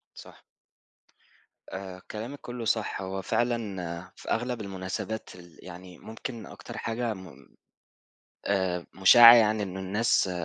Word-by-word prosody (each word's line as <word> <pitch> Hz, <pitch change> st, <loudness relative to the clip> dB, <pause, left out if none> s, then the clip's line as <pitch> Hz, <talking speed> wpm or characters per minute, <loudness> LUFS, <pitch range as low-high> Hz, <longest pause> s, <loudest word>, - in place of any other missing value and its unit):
صح. -, -, -14 dB, 1.3 s
آآ، 95 Hz, -1 st, -7 dB
كلامِك 120 Hz, +7 st, -6 dB
كله 120 Hz, -1 st, -6 dB
صح. 110 Hz, -2 st, -1 dB
هو 95 Hz, 0 st, -4 dB
فعلًا، 95 Hz, -7 st, -2 dB
في -, -, -10 dB
أغلب 120 Hz, 0 st, -1 dB
المناسبات 95 Hz, +2 st, -5 dB
ال 85 Hz, -2 st, -15 dB
يعني 90 Hz, 0 st, -11 dB
ممكن 115 Hz, +1 st, -7 dB
أكتر -, -, -10 dB
حاجة 115 Hz, 0 st, -2 dB
م 85 Hz, -9 st, -13 dB, 1.0 s
آآ، 95 Hz, -3 st, 0 dB
مُشاعة 115 Hz, +5 st, +9 dB
يعني 110 Hz, -2 st, +4 dB
إن 95 Hz, -2 st, -5 dB
الناس 100 Hz, +1 st, +1 dB
100 Hz, 120 wpm, -28 LUFS, 95-115 Hz, 1.3 s, مُشاعة